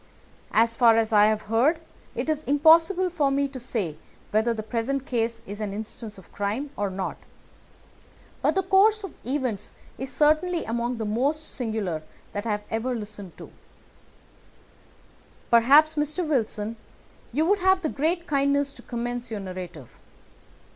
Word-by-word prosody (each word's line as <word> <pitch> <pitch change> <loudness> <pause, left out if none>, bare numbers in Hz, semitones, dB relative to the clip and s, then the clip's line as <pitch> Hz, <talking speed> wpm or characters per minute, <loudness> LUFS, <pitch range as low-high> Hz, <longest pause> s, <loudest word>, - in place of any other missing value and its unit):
As 230 +1 +3
far 230 -2 +6
as 225 -1 +1
I 210 0 +7
have 215 0 +1
heard, 250 +10 +2 0.4
it - - -2
is 310 -1 0
impossible 330 +6 +5
for 300 -5 +1
me 280 +1 +1
to 270 -1 -8
say 205 -10 -3 0.3
whether 220 +3 +2
the 220 -2 -3
present 250 +4 -2
case 230 -3 -1
is 205 +2 -7
an 205 -2 -3
instance 220 0 -7
of 190 - -16
crime 215 +8 -3
or 205 -1 -1
not, 190 0 -4 1.2
but - - +2
the 385 - +2
course 400 +3 +4
of 390 - -6
events 250 -6 -3 0.3
is 265 +1 -4
certainly 310 +3 +2
among 235 +2 -2
the 220 - -3
most 275 +9 0
singular 215 - -2 0.3
that 205 +2 -3
I - - +1
have 210 0 -3
ever 245 +3 -1
listened 205 -4 -8
to. - - -11 2.0
Perhaps, 280 +7 +6
Mr. 305 +3 -1
Wilson, 225 -5 -1 0.5
you 300 +6 +1
would 405 +4 +3
have 375 +1 +3
the - - +1
great 335 +5 -1
kindness 280 -1 +1
to - - -14
recommence 240 0 -4
your 220 -2 -4
narrative. 180 -7 -8
240 Hz, 155 wpm, -25 LUFS, 215-300 Hz, 2.0 s, I